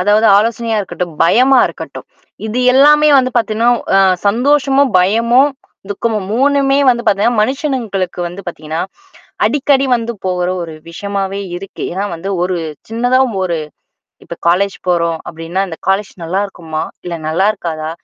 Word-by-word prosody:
அதாவது 210 +4 +3
ஆலோசனையா 230 +1 0
இருக்கட்டும், 180 -3 -5
பயமா 255 +8 +4
இருக்கட்டும். - - -8 0.4
இது 220 +3 -3
எல்லாமே 300 +3 +6
வந்து 255 -1 +1
பார்த்தீங்கன்னா 230 +1 +2 0.3
அ - - +6 0.3
சந்தோஷமும், 275 +4 +2
பயமும், 230 +9 +3 0.4
துக்கமும், 210 -1 -2
3மே 275 +1 +2
வந்து 235 -1 0
பார்த்திங்கன்னா 215 +3 +2
மனுஷனுங்களுக்கு 235 - -2
வந்து 175 +3 -9
பார்த்திங்கன்னா, 160 -1 -5 0.7
அடிக்கடி 275 -1 +2
வந்து 235 0 -4
போகிற 180 -1 -1
ஒரு 165 -2 -7 0.2
விஷயமாகவே 195 +2 -3 0.2
இருக்கு. 195 +2 -9
ஏன்னா 190 +3 -2
வந்து, 175 +4 -5
ஒரு 185 0 -1 0.3
சின்னதா 245 +3 +2 0.2
ஒரு 170 -3 -1 0.7
இப்ப 170 - -7
காலேஜ் 195 +3 +1
போறோம் 170 -2 +1
அப்டின்னா, 165 +3 -3
"இந்த 165 - -7
காலேஜ் 195 +1 0
நல்லாயிருக்குமா? 170 -3 -3 0.2
இல்ல 175 - -4
நல்லாயிருக்காதா? 165 -3 -1
205 Hz, 130 wpm, -15 LUFS, 180-245 Hz, 0.7 s, எல்லாமே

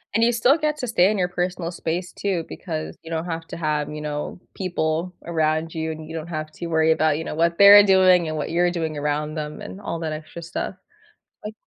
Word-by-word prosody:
And 225 - +3
you 240 - +4
still 245 +6 +4
get 300 -1 0
to 250 - -4
stay 190 -4 +4
in 215 - 0
your 180 -1 +1
personal 180 -1 -3
space 175 +1 -3
too 185 -5 -2
because 160 -4 -5
you 165 - -10
don't 165 +1 -2
have 165 -1 -5
to - - -7
have, 150 -2 -1
you 150 0 -6
know, 150 +3 -4
people 170 -1 -2
around 160 -1 0
you, 160 0 -2
and 155 0 -8
you 160 - -7
don't 160 +1 -5
have 155 -2 -5
to 170 - -7
worry 160 -1 +3
about, 155 -1 +2
you 160 - -4
know, - - -5
what 170 +1 +1
they're 200 +1 +10
doing 185 -3 +5
and 155 0 -3
what 150 - -3
you're 175 +1 +3
doing 160 -3 -3
around 150 +1 -1
them 150 -1 -5
and 195 - -8
all 170 -4 -4
that 160 -2 -3
extra 155 +2 -8
stuff, 170 +3 -4 0.7
like 215 +1 -6
165 Hz, 235 wpm, -23 LUFS, 155-185 Hz, 0.7 s, they're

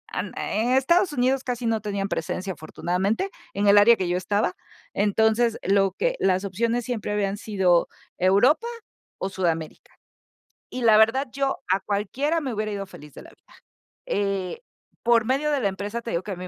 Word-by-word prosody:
an - - -3
en 230 +4 -1
Estados 340 +8 +3
Unidos, 260 +1 +1
casi 250 -2 -3
no 225 -1 0
tenían 200 -1 -2
presencia 185 +4 -3
afortunadamente, 190 - -2 0.2
en 200 +1 0
el 205 +1 +7
área 230 +3 +7
que 185 -5 -2
yo 175 - 0
estaba. 185 +1 0 0.4
Entonces, 220 +3 +2
lo 195 -1 +2
que - - 0
las 190 +1 +1
opciones 230 +4 -1
siempre 230 -4 -3
habían 205 -1 -1
sido 190 -5 +2 0.3
Europa, 220 - +3 0.5
o, 190 - -3
Sudamérica. 175 - -3 0.8
Y 255 - -4
la 225 -2 +6
verdad, 235 +5 +3
yo 275 0 -1
a 190 - +3
cualquiera 240 - -1
me 270 -5 -3
hubiera 215 0 -2
ido 200 -1 -4
feliz 150 -5 -13
de - - -10
la - - -14
vida, - - -22 0.5
eh, 200 - -2 0.4
por 235 -2 +4
medio 275 +5 0
de 290 - +1
la 205 - +2
empresa, 205 +4 -5
te 230 - -7
digo, 170 - -1
que 205 - -6
a - - -3
mí 180 +1 -7
210 Hz, 180 wpm, -24 LUFS, 195-245 Hz, 0.8 s, el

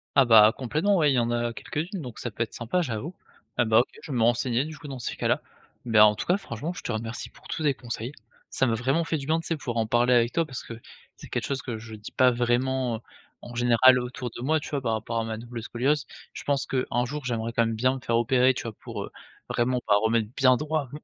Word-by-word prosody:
Ah 135 -2 +6
bah 110 -2 +8
complètement, 155 - +1
ouais, 150 -3 +4
il - - +1
y - - +3
en 120 0 0
a 120 0 -1
quelques-unes, 160 - -4
donc 125 -5 -8
ça 120 - -4
peut 115 - -1
être 115 - -9
sympa, 120 +10 -1
j'avoue 140 +4 -4 0.4
et - - +4
bah 110 -1 +4
OK, 120 - +2
je 150 - -8
vais 125 - -1
me 115 - +3
renseigner 120 +2 +2
du 155 0 -8
coup 150 - -10
dans 130 -2 -6
ces - - -4
cas-là. - - 0 0.4
Beh, 110 -2 +3
en 105 0 +7
tout - - -4
cas, 180 - +3
franchement, 160 - -5
je - - -8
te - - -3
remercie 115 +1 -4
pour - - -18
tous 160 - -4
tes 145 -2 +3
conseils. 120 0 -6 0.4
Ça 135 - +1
m'a 115 - +1
vraiment 135 +8 +1
fait 160 - -1
du 140 - -6
bien, 160 +3 +1
tu 165 - -6
sais, 165 - 0
pour 120 -5 -4
en 110 -1 +1
parler 120 +2 +3
avec 120 0 +3
toi 165 - +2
parce 130 -6 -7
que 115 - -8 0.4
c'est - - -12
quelque - - -2
chose 135 -1 -2
que 120 -4 -5
je 110 0 -9
dis 105 0 -10
pas 130 -1 +5
vraiment, 120 0 0
heu, - - -11 0.4
en 120 - -10
général 120 +2 +5
autour 125 0 -5
de - - -6
moi, 155 +5 +2
tu - - -8
vois, 140 -2 -2
par 115 -3 0
rapport 110 +1 -2
à 115 - 0
ma 110 -1 -4
double 115 0 -7
scoliose. 135 +5 0 0.3
Je - - -8
pense 140 -1 0
qu'un 125 -2 -1
jour, 145 +3 -5
j'aimerais 115 -2 -2
quand 115 0 +3
même 115 0 -1
bien 130 +4 +2
me 135 - -6
faire 115 -3 +1
opérer, 125 +2 +4
tu - - -5
vois 115 -2 -5
pour, - - -7
heu, - - -9 0.4
vraiment 125 +1 +1
pas 105 - +5
remettre 110 -1 +2
bien 130 -1 +5
droit 150 -2 -2
125 Hz, 275 wpm, -26 LUFS, 115-140 Hz, 0.4 s, bah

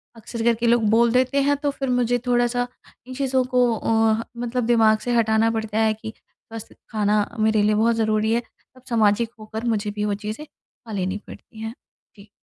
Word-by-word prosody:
अक्सर 225 +1 -6
कर 235 0 +4
के 235 +1 -1
लोग 235 0 +3
बोल 230 +2 +4
देते 255 +3 +2
हैं 285 +1 +2
तो 285 0 -1
फिर 270 -1 -4
मुझे 245 -1 +1
थोड़ा-सा 245 0 +1 0.4
इन 255 - -7
चीज़ों 265 -1 +1
को 245 -2 +3
अ, 225 0 +1
मतलब 240 0 -2
दिमाग 225 -2 +4
से 245 - +1
हटाना 225 0 +3
पड़ता 220 -1 -2
है 220 -1 +3
कि 220 0 -9 0.4
बस 225 -1 -8 0.2
खाना 210 -1 +1
मेरे 220 0 +3
लिए 210 +1 +3
बहुत 230 +2 +2
ज़रूरी 220 0 +1
है। 235 - +1 0.3
तब 255 - -17
सामाजिक 225 0 +2
होकर 220 +2 -6
मुझे 215 -3 -1
भी 210 0 -3
वो 205 - 0
चीज़ें 215 +9 -5
खा 235 -5 -18
लेनी 190 0 -2
पड़ती 220 - -13
हैं। 225 0 -5 0.4
जी। 200 +1 -15
225 Hz, 200 wpm, -22 LUFS, 215-240 Hz, 0.4 s, कर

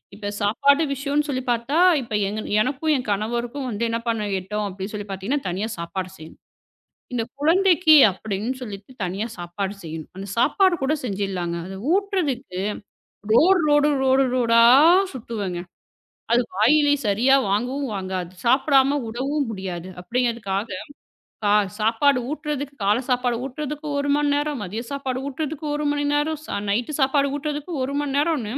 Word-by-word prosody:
இப்ப 205 -1 -5
சாப்பாடு 280 +9 +3
விஷயம்னு 285 +2 -1
சொல்லிப் 255 -2 -3
பாத்தா, 240 +6 0 0.2
இப்ப 230 -3 -8
எங்க 215 +2 -3 0.2
எனக்கும் 280 +5 0
என் 250 -4 -3
கணவருக்கும் 235 +6 -2
வந்து 225 +1 -3
என்ன 230 0 -1
பண்ண 220 -2 0
எட்டும் 210 +3 -3
அப்படின்னு 195 +3 -7
சொல்லிப் 205 -1 -6
பாத்தீங்கன்னா, 200 +8 -2
தனியா 200 +6 -2
சாப்பாடு 185 +2 -4
செய்யணும். 160 0 -13 0.7
இந்தக் 235 0 -3
குழந்தைக்கு 340 0 +5 0.2
அப்படின்னு 210 +5 -3
சொல்லிட்டு 205 +2 -8
தனியா 195 +5 -3
சாப்பாடு 190 +3 -4
செய்யணும். 160 -1 -7
அந்தச் 195 +2 -7
சாப்பாடும் 360 - +3
கூடச் 290 0 -1
செஞ்சுலாங்க. 190 -4 -2
அதை 190 0 -7 0.2
ஊற்றுறதுக்கு 300 - -1 0.7
ரோடு, 360 +9 +5
ரோடு, 295 0 +4
ரோடு, 265 +1 +4
ரோடா 230 -1 +4 0.5
சுத்துவங்க. 205 -8 -4 0.7
அது 240 - +4
வாயிலே 290 +7 +4 0.2
சரியா 240 +7 +4 0.2
வாங்கவும் 250 +5 -1
வாங்காது. 185 -2 -4 0.2
சாப்பிடாம 275 +2 +4
உடவும் 275 +3 -2
முடியாது 185 -2 -6
அப்படிங்கறதுக்காகச் 220 -2 -2 0.5
சா 205 - +3 0.3
சாப்பாடு 235 +5 +3
ஊட்டுறதுக்கு 295 -2 -4
காலைச் 225 +6 +1
சாப்பாடு 245 -1 +1
ஊட்டுறதுக்கு 295 +3 -5
1 285 - -1
மணி 295 0 +1
நேரம், 290 -3 -1
மதிய 210 +5 -4
சாப்பாடு 270 -2 -3
ஊட்டுறதுக்கு 305 +2 -5
1 300 0 -2
மணி 290 0 -1
நேரம், 295 +1 0 0.3
நைட் 235 +8 -1
சாப்பாடு 275 +1 +2
ஊட்டுறதுக்கு 295 +3 -4
1 280 +2 -4
மணி 275 -2 -3
நேரம். 300 -5 +1
245 Hz, 145 wpm, -23 LUFS, 205-290 Hz, 0.7 s, குழந்தைக்கு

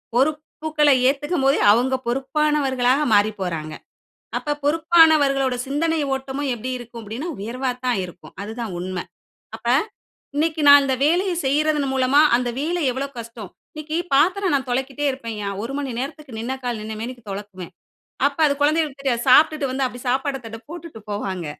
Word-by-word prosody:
பொறுப்புகள 300 +2 +1 0.2
ஏத்துக்கும் 285 +1 -1
போதே 275 - +3
அவங்க 250 +5 +2
பொறுப்பானவர்களாக 270 0 +1
மாறி 205 +1 +4
போறாங்க. 160 -4 -3 0.7
அப்ப 295 -1 -3
பொறுப்பானவர்களோட 300 -4 +4
சிந்தனை 320 +4 0
ஓட்டமும் 270 +1 -3
எப்படி 240 +2 -5
இருக்கும் 240 -1 -10
அப்படின்னா? 225 +9 -6
உயர்வா 250 +6 -3 0.2
தான் 245 -4 +1
இருக்கும். 175 0 -12
அது 210 +2 -6
தான் 225 -5 -4
உண்ம. 185 0 -4 0.6
அப்ப - - -9 0.7
இன்னைக்கு 315 +1 0
நான் 285 0 +9
இந்த 265 -1 +1
வேலைய 360 +5 +2
செய்றதன் 295 0 +1
மூலமா 265 +2 +4 0.2
அந்த 245 0 -1
வேலை 340 +4 -1
எவ்வளோ 260 +3 -3
கஷ்டம். 230 -4 -8 0.2
இன்னைக்கு 310 +1 -5 0.2
பாத்திரம் 365 +6 +3
நான் 270 -2 -1
தொலைக்கிட்டே 265 +3 -2
இருப்பேன்யா, 230 -6 -5
1 235 +4 -4
மணி 280 -2 -3
நேரத்துக்கு 275 -2 -7
நின்ன 235 +4 -3
கால் 240 -3 -3
நின்ன 215 +1 -6
மேனிக்கு 240 +1 -6
தொலக்குவேன். 195 -2 -7 0.5
அப்ப 280 +1 -2
அது 285 - +2
குழந்தைகளுக்கு 295 -1 +1
தெரியாது. 240 -4 0
சாப்ட்டுட்டு 305 +1 +5
வந்து 265 +1 -1
அப்படி 245 0 -7
சாப்பாடு 270 +2 0
தட்ட 225 0 -7
போட்டுட்டு 335 -7 -9
போவாங்க. 190 -4 -3
270 Hz, 155 wpm, -22 LUFS, 235-300 Hz, 0.7 s, நான்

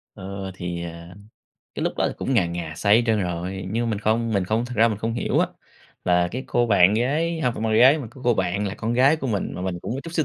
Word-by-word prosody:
Ơ, 95 0 -6
thì, 85 -1 -5
à, 85 +1 -9 0.6
cái - - -4
lúc - - 0
đó - - +1
thì - - -6
cũng 135 - -1
ngà 95 -7 +3
ngà 85 -2 -5
say 100 +4 +4
hết 120 - +3
trơn 110 -3 +2
rồi, 90 +2 -4
nhưng 115 +2 -1
mình 105 - -1
không 110 +2 0
mình 100 -3 +1
không 110 +5 0
thực 125 0 -7
ra 115 +2 +5
mình 105 -2 -3
không 115 +1 -2
hiểu - - 0
á, - - +3 0.6
là 90 0 +3
cái 130 +2 -4
cô 120 0 +1
bạn 100 -3 +5
gái 155 +8 0
hông 125 -5 +1
phải - - -5
bạn 110 - 0
gái, 135 +5 +7
mà 130 - -6
có 130 - -15
cô 120 - +4
bạn 95 +1 -1
là 95 - -4
con 115 +2 -3
gái 135 +5 +4
của 145 - -4
mình, 105 -6 -2
mà 90 - -5
mình 95 -2 -3
cũng - - -3
có 135 - -4
chút 165 - -7
xíu 160 -3 +1
110 Hz, 285 wpm, -23 LUFS, 90-120 Hz, 0.6 s, gái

